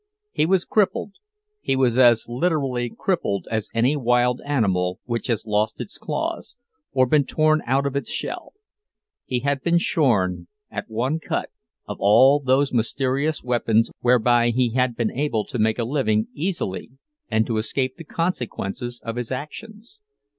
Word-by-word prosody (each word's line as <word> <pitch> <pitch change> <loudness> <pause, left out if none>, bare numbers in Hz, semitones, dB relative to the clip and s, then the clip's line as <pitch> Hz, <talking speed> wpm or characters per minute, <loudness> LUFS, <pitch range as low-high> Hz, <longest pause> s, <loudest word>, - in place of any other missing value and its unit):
He 155 - +1
was 185 0 +2
crippled—he 420 - -2
was 130 -2 +2
as 120 -3 +5
literally 130 -2 -1
crippled 175 - -1
as 110 -2 -2
any 120 +6 +2
wild 125 -2 +2
animal 95 -10 0
which 120 -2 -3
has 115 -3 -1
lost 105 0 0
its 200 - -7
claws, - - -4 0.3
or 130 -1 +3
been 145 +3 +3
torn 155 +2 +2
out 135 +3 +2
of 140 -1 -2
its 140 - -2
shell. - - -5 0.7
He 125 -1 -2
had 140 0 0
been 170 +3 +2
shorn, 95 - +1 0.2
at - - -5
one 125 +8 -1
cut, - - -3 0.4
of - - -5
all 130 +8 +6
those 135 0 +1
mysterious 135 +6 0
weapons 115 -2 +1
whereby 120 -1 +3
he 120 0 +1
had 125 0 +1
been 115 -2 -1
able 130 -6 -1
to 125 - -5
make 110 0 +2
a 120 - -1
living 110 -5 0
easily 155 - -3 0.4
and 110 0 +2
to 115 -1 -2
escape 130 +4 -2
the 165 - -9
consequences 125 - -3
of 115 +1 -5
his 120 0 -4
actions. 215 - -8
125 Hz, 155 wpm, -23 LUFS, 115-150 Hz, 0.7 s, all